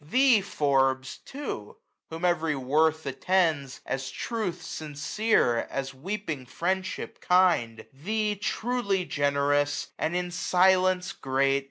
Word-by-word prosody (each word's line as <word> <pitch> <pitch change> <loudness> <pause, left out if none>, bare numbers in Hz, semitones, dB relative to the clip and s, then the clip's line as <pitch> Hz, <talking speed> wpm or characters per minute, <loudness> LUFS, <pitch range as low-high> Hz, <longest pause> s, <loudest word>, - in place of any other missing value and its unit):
Thee, 250 - +4
Forbes, 135 -7 0
too, 270 - -7 0.3
whom 165 +2 -4
every 165 -3 +1
worth 155 +4 +1
attends. 150 -1 0
As 135 0 -3
truth 220 -7 -3
sincere, 150 - 0
as 135 0 -4
weeping 155 -3 -5
friendship 185 +7 -3
kind; 175 -12 +2
Thee, 210 +9 -1
truly 205 -2 -1
generous, 145 0 +1
and 160 - -1
in 180 0 -1
silence 185 +1 +3
great. 135 -2 +1
160 Hz, 110 wpm, -27 LUFS, 140-190 Hz, 0.3 s, Thee